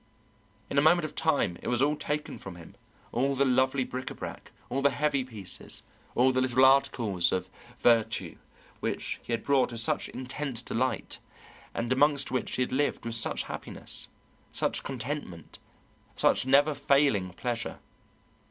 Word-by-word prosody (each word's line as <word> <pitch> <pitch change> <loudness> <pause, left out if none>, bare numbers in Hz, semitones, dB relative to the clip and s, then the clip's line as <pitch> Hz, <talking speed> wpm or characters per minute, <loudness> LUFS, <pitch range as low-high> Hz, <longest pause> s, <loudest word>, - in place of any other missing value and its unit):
In 140 - +2
a - - +5
moment 160 +2 +5
of - - -6
time 140 - +1
it - - -7
was 120 -1 +1
all 145 +3 +3
taken 150 0 -3
from 95 -2 -8
him, 85 -2 -12 0.4
all 135 +3 +1
the 140 +1 +3
lovely 130 +1 +3
bric 130 +1 -5
à - - -4
brac, - - -7 0.2
all 135 - -1
the 140 - +5
heavy 145 -2 +1
pieces, 110 -7 -6 0.3
all 130 +2 +5
the 130 0 +1
little 130 0 +4
articles 115 -9 +3
of 95 0 -2 0.3
vertu 115 -3 +2 0.4
which - - -3
he - - -8
had 115 -1 -1
bought 135 -3 +3
with 115 - -5
such 115 - 0
intense 130 -1 -4
delight 130 +3 -2 0.6
and 120 +2 0
amongst 145 0 +3
which 130 -2 -1
he 125 - +2
had - - -4
lived 140 -2 0
with 115 - -2
such 115 - 0
happiness, - - -6 0.4
such - - -1
contentment, 125 - -5 0.6
such - - +2
never 145 +3 +5
failing 140 -9 +3
pleasure. 115 +4 -3
130 Hz, 160 wpm, -29 LUFS, 115-140 Hz, 0.6 s, a